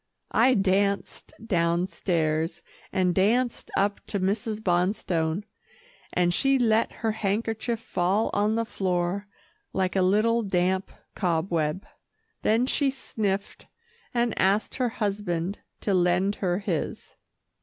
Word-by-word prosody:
I 255 +3 +4
danced 200 0 0
downstairs, 170 -3 0 0.3
and 185 -2 +2
danced 230 +7 +1
up 200 +1 +1
to 200 - -2
Mrs. 210 +3 -1
Bonstone, 175 -2 0 0.7
and 175 -1 +2
she 270 +7 +3
let 225 -2 +2
her 220 - +3
handkerchief 220 +2 -1
fall 200 0 0
on 210 +2 +2
the 230 0 0
floor 185 -1 -1 0.5
like 185 0 0
a 190 - +3
little 215 +5 +3
damp 190 -1 0 0.2
cobweb. 170 -2 0 0.6
Then 225 +3 +3
she 275 +1 +1
sniffed, 205 -6 -3 0.4
and 235 -2 +1
asked 195 +3 +2
her 250 -2 +1
husband 200 -4 -2 0.2
to 200 - 0
lend 180 +2 +3
her 180 -2 +1
his. 190 -6 -3
195 Hz, 115 wpm, -26 LUFS, 180-220 Hz, 0.7 s, I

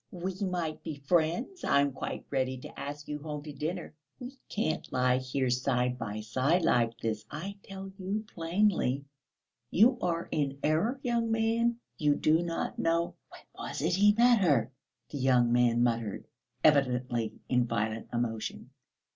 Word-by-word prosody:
We 185 +1 -4
might 175 -5 -2
be 160 -3 -5
friends; 170 - 0
I - - +4
am 140 0 +2
quite 135 - -5
ready 130 0 0
to 125 - -10
ask 145 +1 -6
you 150 0 -4
home 150 -1 -6
to 150 -1 -8
dinner. 160 +5 -4 0.3
We 250 +2 -8
can't 155 -7 -2
lie 125 0 +2
side 125 -1 0
by 110 -2 -4
side 130 +11 +1
like 115 -5 +2
this, 110 -1 -2
I 195 +6 -5
tell 195 0 -8
you 200 +4 -2
plainly. 165 -6 +1 0.6
You 240 - +5
are 170 -1 -1
in 140 -3 -1
error, 200 - +1
young 235 -2 +1
man, 225 +1 +2 0.2
you 145 -1 +3
do 155 +3 +3
not 170 -1 -3
know...." 170 +1 +1 0.2
"When - - -13
was - - -6
it 170 +3 +2
he 205 +3 +5
met 240 0 +5
her?" 135 - +3 0.4
the 145 - -5
young 125 -2 +4
man 120 -1 +4
muttered, 115 -4 -1 0.4
evidently 125 -6 +2
in 125 -1 +2
violent 110 -1 -2
emotion. 115 -2 -3
150 Hz, 155 wpm, -30 LUFS, 125-185 Hz, 0.6 s, You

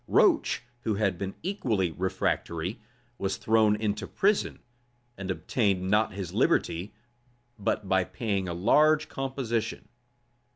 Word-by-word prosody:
Roach, - - +3 0.2
who 110 -3 -1
had 100 -4 0
been 95 0 -4
equally 115 - 0
refractory, 90 +2 -2 0.4
was 95 -1 -1
thrown 110 -1 +3
into 105 -1 -2
prison, 205 +1 +1 0.6
and 100 -1 -6
obtained 95 +2 0
not 105 0 +3
his 95 -3 -5
liberty 95 +6 +1 0.6
but 100 0 -1
by 95 -1 +3
paying 100 -2 -2
a - - -2
large 150 - +4
composition. 120 -5 -3
105 Hz, 120 wpm, -28 LUFS, 95-115 Hz, 0.6 s, large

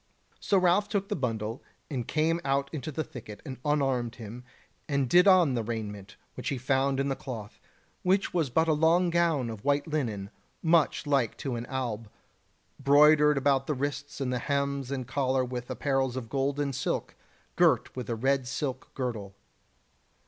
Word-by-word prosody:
So 200 - +2
Ralph 185 +3 +3
took 200 -1 -1
the 205 - 0
bundle, 115 - -3 0.3
and 125 -6 -4
came 165 +2 +1
out 140 0 0
into 155 0 -4
the 155 +2 -2
thicket 110 -6 -10
and 130 -4 -7
unarmed 135 -5 0
him, 115 +1 -9 0.5
and 140 -2 +1
did 180 +9 +6
on 180 -7 +6
the 120 - 0
raiment 105 -3 -5 0.2
which - - -4
he 140 - -1
found 135 +2 +1
in 135 - +1
the 135 - 0
cloth, 115 -7 -8 0.4
which 190 +2 +1
was 165 -6 +1
but 160 +6 +2
a 160 - +4
long 165 +3 +3
gown 165 -7 +2
of 110 -2 -9
white 145 0 +2
linen, 115 - -3 0.3
much 165 -1 +3
like 140 -5 +1
to 135 -3 -3
an 120 +1 -5
alb, 115 -5 -3 0.7
broidered 150 +1 +6
about 135 0 +2
the 150 - 0
wrists 140 +1 -4
and 130 -2 -1
the 125 - -1
hems 140 0 -1
and 135 -2 -3
collar 130 -1 +1
with 125 -1 -5
apparels 135 -3 0
of 120 -4 -5
gold 140 +1 -1
and 140 -2 -1
silk, 135 - -2 0.4
girt - - +3
with 125 -3 -5
a 115 - 0
red 135 +2 +1
silk 130 0 -4
girdle. 110 -7 -4
135 Hz, 180 wpm, -28 LUFS, 125-150 Hz, 0.7 s, did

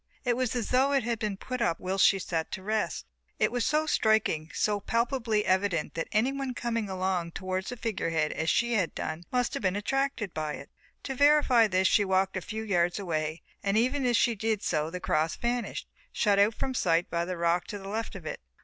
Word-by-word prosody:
It 245 -1 +2
was 255 -1 -1
as 240 -3 -2
though 265 +3 +3
it 270 -3 +2
had 230 -1 -2
been 210 -3 -2
put 255 +4 -5
up 170 -8 +1
whilst 190 +1 +3
she 195 - +3
sat 165 -3 -3
to 190 - -5
rest. 215 +2 -1 0.3
It - - +2
was 245 -1 0
so 305 +1 +2
striking, 220 - +2
so 210 -1 0
palpably 230 0 0
evident 185 -4 +1
that 165 - -3
anyone 260 +4 0
coming 230 -4 -2
along 185 -2 -1
towards 185 0 -3
the 245 - -6
figure 225 -6 -2
head 155 -2 0
as 160 - -1
she 235 0 +2
had 195 -7 0
done 160 +2 -4
must 250 -1 0
have - - -3
been 185 -2 +1
attracted 260 -2 -1
by 155 -1 -3
it. - - -9 0.3
To 270 - -3
verify 275 -4 +5
this 185 -1 +2
she 205 - +4
walked 190 0 +1
a 185 - -2
few 220 +5 -5
yards 175 -4 +1
away 155 -4 -3 0.2
and 200 +1 +1
even 255 +5 +1
as 240 -2 +3
she 235 - +3
did 220 -1 -1
so 155 -1 0
the 180 +2 -5
cross 155 -2 0
vanished, 240 0 -2 0.2
shut 205 -3 +2
out 210 +2 +4
from 265 - -2
sight 175 -7 +2
by 170 0 0
the 180 +1 -4
rock 170 +1 +1
to 205 - -5
the 195 -1 -9
left 220 +2 -4
of 180 -5 -9
it. 155 - -5
205 Hz, 220 wpm, -28 LUFS, 180-235 Hz, 0.3 s, verify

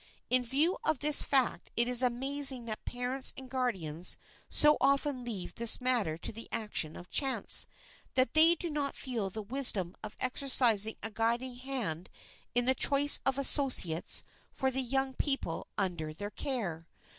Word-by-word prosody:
In 255 0 +3
view 290 +9 -1
of 315 -2 0
this 295 +3 +6
fact 265 -4 -1
it 235 +1 +2
is 250 0 +6
amazing 260 +1 -1
that 215 -2 -6
parents 250 +2 -2
and 265 -1 -8
guardians 185 - +1 0.3
so 300 0 +3
often 275 -1 0
leave 195 -7 -6
this 235 -1 +5
matter 240 -11 0
to - - 0
the 230 +1 -9
action 210 -8 -4
of 180 - -13
chance, 270 -2 +3 0.5
that 255 -3 +1
they 325 +2 +6
do 340 0 -6
not 290 -2 -3
feel 230 -7 -4
the 215 +3 -7
wisdom 205 -6 0
of 215 - -8
exercising 245 -5 +3
a 225 - +2
guiding 235 +3 -2
hand 245 -11 -5 0.5
in 245 0 +2
the 260 - +2
choice 280 +2 +5
of 270 0 +1
associates 260 - +1 0.3
for 265 -1 -2
the 265 +1 -1
young 265 +1 -2
people 275 +1 -3
under 170 -6 -3
their 205 +5 -7
care. 190 - -5
250 Hz, 160 wpm, -30 LUFS, 215-270 Hz, 0.5 s, this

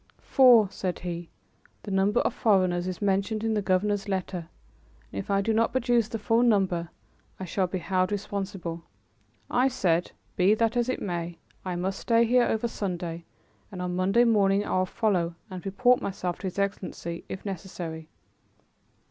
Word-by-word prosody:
"For," 245 -5 +6
said 180 -3 -3
he, 175 -1 -6 0.5
"the 205 - -6
number 195 +2 +2
of - - 0
foreigners 185 -5 +2
is 185 +2 -4
mentioned 200 +2 0
in 225 -1 +1
the 210 - +1
governor's 200 +2 0
letter, 185 -3 -3 0.6
and - - -3
if - - -6
I 200 0 +2
do 220 +3 0
not 230 +1 +2
produce 240 -3 +2
the 225 - -4
full 225 +2 +2
number, 190 -8 +2 0.5
I 190 - -4
shall 185 +1 0
be 185 - -3
held 185 +1 0
responsible." 195 -4 -4 0.7
I 250 +2 +3
said, 180 -10 +1 0.2
"Be 190 +4 +4
that 230 +1 +1
as 240 0 +1
it 255 - -2
may, 170 -2 -3 0.3
I 185 -2 -3
must 190 +2 -2
stay 230 0 +3
here 245 +1 +4
over 225 +2 0
Sunday 175 -6 -4 0.5
and 185 - -7
on 180 0 -2
Monday 195 +6 +3
morning 205 -3 +3
I - - -1
will 185 - +1
follow 180 -6 0 0.2
and 185 -1 -7
report 245 +6 +3
myself 180 -2 -3
to 195 - -4
his 185 - -6
Excellency 190 -4 -3
if 190 - -7
necessary." 170 -4 -6
195 Hz, 175 wpm, -27 LUFS, 180-220 Hz, 0.7 s, For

